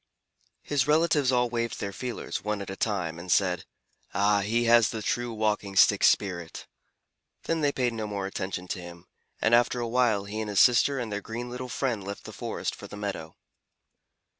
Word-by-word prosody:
His 145 -2 0
relatives 150 -3 +3
all 125 -1 +3
waved 115 -1 -2
their 100 -1 -4
feelers, 125 +2 -5
one 105 -1 -1
at 100 -1 -6
a - - -5
time, 90 -7 -2
and 90 +1 -5
said, 90 -3 +2 0.5
"Ah, 100 +1 +3
he 115 +4 +1
has 115 -1 +5
the 110 -2 -5
true 120 0 -1
Walking 105 -3 -1
Stick - - +5
spirit!" 85 -5 +1 0.8
Then 165 -1 -1
they 145 -1 +3
paid 125 -3 0
no 110 -2 -4
more 100 -2 -3
attention 95 -1 -4
to 90 - -3
him, 85 0 -11 0.4
and 110 - +3
after 120 +1 +4
a 120 - -2
while 115 -4 +2
he 105 +2 -4
and 110 - -4
his 100 - +1
sister 130 +3 +5
and 120 -4 -3
their 105 0 -3
green 120 +3 -6
little 125 +1 -6
friend 120 -6 -2
left 100 +1 -7
the - - -9
forest - - -4
for - - -10
the 105 - -9
meadow. 100 -6 -5
110 Hz, 195 wpm, -27 LUFS, 100-120 Hz, 0.8 s, has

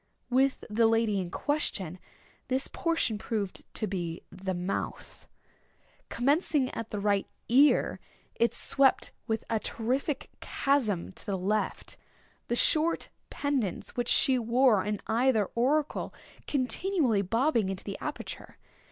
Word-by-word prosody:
With 265 +2 +2
the 225 +2 +3
lady 225 -3 +2
in 180 -2 -3
question 190 - -2 0.5
this 265 0 -1
portion 330 -10 0
proved 210 -4 -4
to 215 - 0
be 175 -4 -4
the 190 0 -4
mouth. 180 +2 -4 0.8
Commencing 280 +1 +1
at 230 0 -5
the 210 - -3
right 200 -1 +1 0.2
ear, 275 +5 +4 0.3
it 235 - +2
swept 275 -1 +2 0.2
with 220 -1 -1
a 225 -1 0
terrific 255 +7 -2
chasm 235 -12 0
to - - -14
the 195 -2 0
left—the 210 +4 -4
short 315 +6 +3 0.2
pendants 270 -10 -2
which 245 -1 0
she 260 -2 +4
wore 235 -3 +4
in 210 -1 -2
either 225 -2 +2
auricle 280 +5 0 0.3
continually 280 - +1
bobbing 230 - +1
into 190 -1 -4
the 200 - -6
aperture. - - -6
230 Hz, 125 wpm, -29 LUFS, 200-270 Hz, 0.8 s, ear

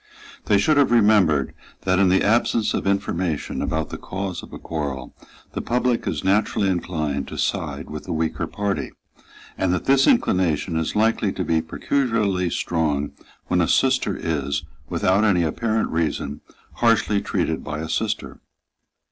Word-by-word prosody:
They 105 - +4
should 150 +9 +3
have 145 - +5
remembered 105 - +4 0.3
that, 95 0 +1
in 95 -2 +5
the 95 +1 +3
absence 115 0 +2
of - - -2
information 95 -5 -1
about 80 -1 -2
the - - -6
cause 95 -1 -4
of - - -13
a - - -7
quarrel, 70 -5 -5 0.4
the - - -3
public 125 0 0
is 80 -5 -2
naturally 100 0 +2
inclined 80 -6 -2
to - - -7
side - - -2
with 75 0 -7
the - - -5
weaker 80 0 -1
party, 100 -1 -3 0.7
and 95 - +1
that 90 - -4
this 135 0 +4
inclination 90 - +2
is 80 -1 -1
likely 110 -1 +2
to - - -2
be 80 -1 +2
peculiarly 105 - 0
strong 75 -4 -1 0.3
when 90 0 +1
a 85 - +2
sister 130 -6 +2
is, 70 -3 -1 0.3
without 95 +3 +2
any 95 -5 +3
apparent 110 +8 0
reason, 80 -3 -2 0.4
harshly 115 -3 +3
treated - - -1
by 75 0 -4
a 80 +1 -4
sister. 80 - -2
95 Hz, 155 wpm, -23 LUFS, 80-105 Hz, 0.7 s, have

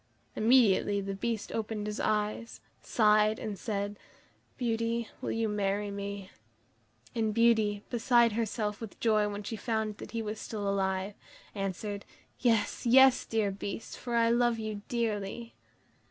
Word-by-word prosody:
Immediately 215 -4 +4
the 195 0 -4
Beast 220 +2 -3
opened 215 -1 -3
his 210 0 -4
eyes, 215 +2 -1 0.2
sighed, 215 -1 +3
and 215 -2 -4
said: 205 0 -3 0.6
"Beauty, 230 -1 -1
will - - -3
you 225 0 0
marry 205 0 -1
me?" 200 -1 -6 0.8
And 220 -3 0
Beauty, 220 -3 +3
beside 240 -1 +4
herself 210 -1 -2
with 225 -3 -8
joy 215 -2 +3
when 205 0 -5
she 225 - -4
found 220 -1 -2
that - - -9
he 230 -1 -3
was 215 0 -4
still 205 -3 -4
alive, 190 0 0 0.4
answered: 200 +1 -4 0.4
"Yes, 225 -4 +1
yes, 265 +1 +6
dear 220 -3 +1
Beast, 200 +2 -6
for 240 -1 -4
I 230 0 +4
love 240 -1 +3
you 215 -2 -4
dearly." 230 -1 -2
215 Hz, 140 wpm, -30 LUFS, 205-230 Hz, 0.8 s, yes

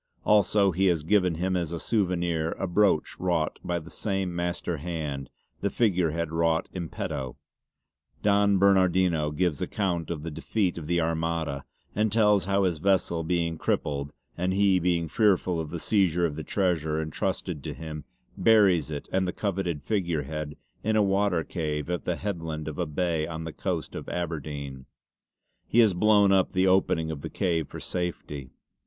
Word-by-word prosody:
Also 100 -1 +4
he 95 +3 +2
has 85 -4 +2
given 90 -1 +2
him 90 +3 -1
as 85 -3 -1
a 85 - -3
souvenir 85 -6 0
a - - -2
brooch 95 -3 +2
wrought 85 -4 0
by 85 - -1
the 85 0 -8
same 95 -4 -2
master 85 -1 -2
hand, 75 -4 -4 0.3
the 100 - 0
figurehead 85 -7 +1
wrought 80 0 +1
in 85 -3 -4
petto. 65 -2 -4 0.9
Don 100 -1 +4
Bernardino 95 -5 +3
gives 75 0 0
account 90 -5 -1
of 80 -3 -4
the 85 - -4
defeat 90 +2 -1
of 75 - -8
the 85 0 +2
Armada 80 -3 -1 0.3
and 105 +1 +1
tells 105 -3 +4
how 100 +1 +2
his 85 -4 0
vessel 90 -2 +1
being 85 -1 -1
crippled 70 0 -1 0.2
and 90 +2 -1
he 100 -2 +4
being 85 -1 +1
fearful 95 -1 +2
of 80 -2 -4
the 85 - -5
seizure 90 -3 +2
of 75 -3 -2
the 80 - -5
treasure 80 -6 0
entrusted 80 -2 -3
to - - -4
him 75 -2 -7 0.3
buries 100 -9 +4
it 75 -2 -5
and 95 0 +1
the - - 0
coveted 90 -8 -2
figurehead 75 -7 -2 0.3
in 110 +1 +1
a 105 - +4
water 95 -3 +2
cave 75 -2 -3
at 90 -5 -3
the - - 0
headland 80 -6 -4
of 80 +1 -5
a 90 - 0
bay 80 0 -1
on 80 -1 -5
the 80 -1 -6
coast - - -3
of - - -7
Aberdeyne. 75 -6 -4 0.8
He - - -1
has 110 -5 +6
blown 100 +1 +4
up 95 -2 +3
the 95 +1 +3
opening 90 -4 +2
of 75 -3 -6
the - - -5
cave 85 -5 0
for - - -8
safety. 75 -6 -4
85 Hz, 175 wpm, -27 LUFS, 80-95 Hz, 0.9 s, has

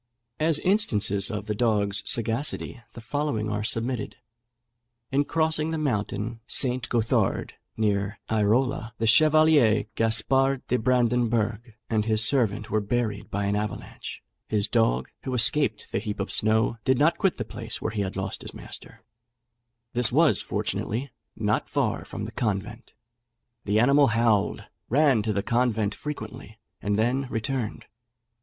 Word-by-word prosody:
As 155 0 +2
instances 105 - +2
of 105 -3 -4
the 105 - -2
dog's 105 -3 +1
sagacity, 120 +2 0
the 115 - -10
following 110 -4 -2
are 105 0 -2
submitted. 115 +1 -3 0.9
In 140 +2 +2
crossing 160 0 +1
the 160 - -2
mountain 115 -5 -2
St. 125 -2 +2
Gothard, 115 -2 0 0.2
near 100 -1 0
Airola, 110 +3 0
the 115 - -1
Chevalier 150 -3 +5
Gaspard 125 +5 +2
de 125 - +1
Brandenberg 115 -2 0
and 110 -2 0
his 110 0 +3
servant 110 -5 +3
were 110 - +1
buried 105 -1 -2
by 100 0 -2
an 100 +1 0
avalanche; 105 0 -5 0.2
his 105 -1 0
dog, 85 - +1
who 130 - -4
escaped 120 -3 +2
the - - 0
heap 105 -1 -5
of 100 - -3
snow, 110 +2 +2
did 130 -1 +2
not 160 +5 +2
quit 195 - +1
the - - -4
place 115 0 -5
where 110 - -3
he 105 -2 -2
had 95 -1 -4
lost 95 0 -4
his - - -9
master: - - -11 0.9
this 125 -1 +1
was, - - +4
fortunately, 125 +5 -3 0.2
not - - -1
far - - -1
from - - -7
the - - -5
convent; 100 -5 -4 0.7
the 105 +1 +2
animal 140 +4 +5
howled, 115 -2 +1 0.3
ran 135 -3 +3
to 110 +1 -2
the 100 -1 -1
convent 115 -4 0
frequently, 110 -6 -8 0.2
and 105 0 -1
then 125 +5 0
returned. 120 -1 -3
115 Hz, 145 wpm, -25 LUFS, 105-130 Hz, 0.9 s, Chevalier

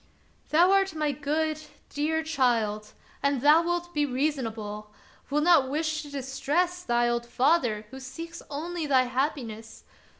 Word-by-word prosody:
" - - -36
Thou 345 +4 +5
art 390 -3 +2
my 305 -1 0
good, 305 +2 -1 0.3
dear 320 +2 -1
child, 230 -8 0 0.3
and 280 -1 +1
thou 300 +4 +6
wilt 345 0 -2
be 295 - +1
reasonable, 230 -7 -3 0.4
wilt 300 +2 +1
not 320 -6 +5
wish 310 +1 -1
to 295 - -10
distress 285 +6 -1
thy 240 -6 +1
old 235 0 -1
father, 245 -5 +1
who 265 - -8
seeks 330 +6 -8
only 325 +2 -4
thy 260 -2 +4
happiness. 245 -4 -3
285 Hz, 145 wpm, -27 LUFS, 250-320 Hz, 0.4 s, thou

